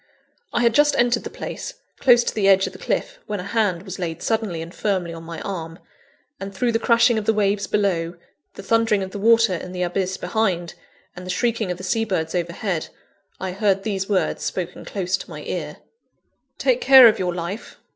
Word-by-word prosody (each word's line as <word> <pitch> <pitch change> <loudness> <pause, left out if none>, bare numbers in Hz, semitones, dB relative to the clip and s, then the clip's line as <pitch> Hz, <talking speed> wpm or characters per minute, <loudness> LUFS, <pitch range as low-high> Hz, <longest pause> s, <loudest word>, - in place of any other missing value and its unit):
I - - 0
had 235 -1 +4
just 295 +3 +4
entered 240 0 +2
the - - -4
place, - - -7 0.2
close 240 -2 +5
to - - -2
the 205 -3 +1
edge 195 0 +5
of - - -6
the - - -12
cliff, - - -2
when 210 - -3
a - - -5
hand 200 -4 0
was 190 -1 -7
laid 170 -2 -4
suddenly 220 -7 -1
and 170 +2 -11
firmly 185 -5 -1
on 165 - -8
my 165 0 -7
arm; 165 -4 -5 0.6
and, 195 0 -6
through 240 +5 +1
the 225 - +1
crashing 235 -1 +4
of 210 - -6
the 220 - +2
waves 200 -1 +1
below, 180 -5 0 0.4
the 195 - -9
thundering 225 -1 +2
of 190 - -6
the 205 - -6
water 225 -1 +4
in 180 +1 -5
the 180 0 -2
abyss 185 +1 -1
behind, 180 -3 -1 0.4
and 180 - -8
the 185 - -8
shrieking 230 +1 0
of 180 - -2
the 185 - -10
seabirds 190 -6 -1
overhead, 175 0 -2 0.5
I 190 -1 -3
heard 195 0 +1
these 195 -3 -2
words, 195 -3 0
spoken 180 -1 -4
close 190 -1 -1
to - - -10
my - - -8
ear: - - -4 0.8
"Take - - +1
care 265 - +9
of 225 0 +3
your 180 -2 -1
life. 180 +5 -6
195 Hz, 205 wpm, -22 LUFS, 180-225 Hz, 0.8 s, care